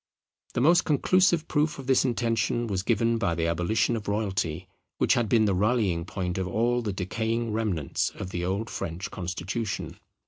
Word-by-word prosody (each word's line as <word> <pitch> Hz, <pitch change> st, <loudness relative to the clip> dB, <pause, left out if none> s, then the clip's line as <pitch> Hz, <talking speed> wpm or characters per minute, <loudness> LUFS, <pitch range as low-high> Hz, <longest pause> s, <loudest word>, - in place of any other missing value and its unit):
The -, -, +1 dB
most 170 Hz, +6 st, +5 dB
conclusive 170 Hz, +2 st, +3 dB
proof 150 Hz, +1 st, +1 dB
of 135 Hz, -, -8 dB
this 130 Hz, 0 st, +3 dB
intention 120 Hz, -1 st, 0 dB
was 100 Hz, -5 st, -1 dB
given 115 Hz, +2 st, +1 dB
by 85 Hz, -6 st, 0 dB
the 80 Hz, 0 st, 0 dB
abolition 95 Hz, +7 st, +1 dB
of 110 Hz, -3 st, -5 dB
royalty; 95 Hz, -5 st, -1 dB, 0.3 s
which -, -, +3 dB
had 120 Hz, -3 st, +1 dB
been 110 Hz, -2 st, +4 dB
the 100 Hz, -, +2 dB
rallying 100 Hz, -4 st, +1 dB
point 90 Hz, -1 st, -3 dB
of 95 Hz, -, -2 dB
all 120 Hz, +6 st, +1 dB
the 110 Hz, -3 st, -2 dB
decaying 110 Hz, +5 st, -2 dB
remnants 100 Hz, -10 st, -1 dB
of 95 Hz, -, -6 dB
the 85 Hz, -1 st, -3 dB
old 95 Hz, +5 st, -1 dB
French 90 Hz, +1 st, -5 dB
constitution. 95 Hz, +4 st, -4 dB
110 Hz, 175 wpm, -27 LUFS, 95-120 Hz, 0.3 s, most